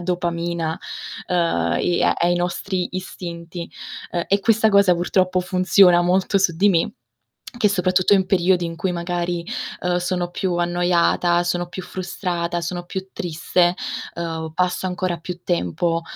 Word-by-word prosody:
dopamina, 170 -1 -2 0.5
uhm, 180 - 0 0.4
e 175 -1 +2
ai 175 +1 +2
nostri 180 +1 -2
istinti, 170 -2 -6 0.4
uhm, 175 -1 -1
e 200 +1 +2
questa 220 +1 +3
cosa 200 -3 +5
purtroppo 185 +1 +1
funziona 180 0 +5
molto 185 +3 +2
su 180 -4 +1
di 200 +5 +4
me 165 -3 +1 0.6
che 220 -4 +3
soprattutto 185 0 +3
in 190 -2 +2
periodi 180 -1 +2
in 165 0 -4
cui 170 +3 -2
magari, 175 0 -2 0.4
uhm, 180 0 +1
sono 180 0 -1
più 180 0 -1
annoiata, 175 0 +2
sono 175 0 -1
più 185 +2 -7
frustrata, 175 -2 -3
sono 175 +1 -4
più 190 +2 -6
triste, 175 -1 +1 0.4
uhm, 165 -1 -4
passo 180 +2 0
ancora 180 -1 -2
più 175 +2 -7
tempo, 170 - 0
175 Hz, 140 wpm, -21 LUFS, 170-185 Hz, 0.6 s, cosa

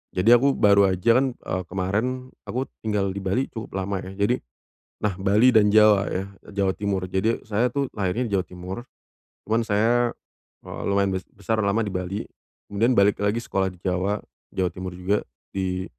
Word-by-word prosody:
Jadi 95 +6 +4
aku, 135 +3 +5
baru 100 -1 +5
aja 105 +6 +3
kan, 130 -2 -1
eee, 95 - -4
kemarin 110 +8 -2 0.2
aku 130 +2 -1 0.2
tinggal 105 -3 -1
di 100 - -5
Bali, 100 +8 -1
cukup 110 -4 -7
lama 95 0 -2
ya, 95 +1 -8
jadi 100 +5 +1 0.6
nah, 105 -3 -1
Bali 100 +6 +4
dan 105 -1 +6
Jawa 105 -2 +5
ya, 95 +1 -2 0.2
e - - -15
Jawa 100 -1 +1
Timur. 100 -3 -2
Jadi 95 +5 0
saya 115 +3 +1
tuh, 140 0 -1
lahirnya 105 +5 -1
di - - -8
Jawa 95 - +1
Timur. 90 +3 -8 0.7
Cuman 110 +2 +1
saya, 115 +3 +2 0.5
eee, - - -7
lumayan 100 -1 +2
bes 95 0 -3
besar 110 +3 -2
lama 100 +3 +1
di 100 - -4
Bali. 90 +2 -3 0.5
Kemudian 115 +5 +2
balik 100 +1 +4
lagi 105 +3 +1
sekolah 95 0 0
di - - -16
Jawa, 95 +3 0 0.4
Jawa 95 -1 +1
Timur 95 0 -6
juga. 95 +3 0 0.3
Di 95 -1 -2
100 Hz, 185 wpm, -24 LUFS, 95-115 Hz, 0.7 s, dan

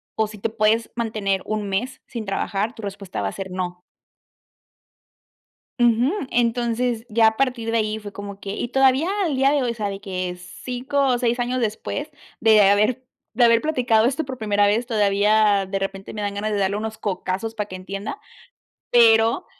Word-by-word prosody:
o 220 -1 +1
si 210 0 -11
te 210 - -1
puedes 220 +1 +1
mantener 215 -5 -1
un 215 -2 -3
mes 230 +7 -3
sin 230 -4 -6
trabajar, 200 +3 -2
tu - - -10
respuesta 200 - -5
va 100 - -1
a - - -7
ser 190 -1 -6
no". 180 -1 -4 2.0
Ujú, 240 +3 +3 0.2
entonces 235 0 0
ya 225 -1 +4
a 220 0 +1
partir 250 -4 0
de 230 - +2
ahí 215 0 -1
fue 205 -1 -9
como 200 0 -8
que 200 - -7
y 210 - -3
todavía 270 +4 +3 0.2
al 305 -7 -1
día 270 +1 +4
de 285 -3 +2
hoy, 240 -2 -1
¿sabe 205 -3 -4
qué? 185 -3 -4 0.3
5 255 +3 -2
o 250 -2 +2
6 240 0 0
años 245 +1 -1
después 230 +7 -3 0.3
de 220 -1 +6
haber 215 +5 +2 0.3
de 240 +2 +4
haber 230 0 +5
platicado 240 -7 +2
esto 275 +6 0
por 260 -1 -6
primera 205 -2 +2
vez, 225 +4 +1
todavía 210 -2 +3
de 195 +1 -3
repente 195 0 -5
me 210 - -5
dan 205 -1 -2
ganas 215 +2 -2
de 210 - 0
darle 195 0 +1
unos 220 +1 -4
cocazos 200 +2 -3
para 210 -1 -3
que 185 - -6
entienda, 195 - -6 0.7
pero, 230 +5 +5
220 Hz, 185 wpm, -22 LUFS, 200-240 Hz, 2.0 s, de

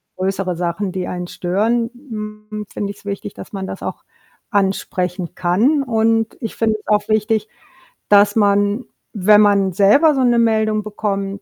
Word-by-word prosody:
größere 190 -1 -2
Sachen, 180 +3 -2
die 185 -2 -3
einen 180 0 -4
stören, 220 +8 0
hm, 210 -4 -8
finde 200 -1 -3
ich's 200 - -15
wichtig, 200 0 -5
dass - - -11
man 195 -2 -5
das - - -7
auch - - -6 0.5
ansprechen 185 -3 -1
kann 220 - +2
und 225 -3 +1
ich 225 - -5
finde 220 -1 +1
es 210 - -20
auch 210 -1 +1
wichtig, 215 0 +1 0.6
dass 205 0 +5
man, 205 +2 +2 0.3
wenn 210 0 +5
man 200 -2 +3
selber 215 - +5
so 265 - +1
'ne 240 -1 +3
Meldung 220 -2 +1
bekommt, 200 -2 -3
205 Hz, 160 wpm, -19 LUFS, 195-220 Hz, 0.6 s, dass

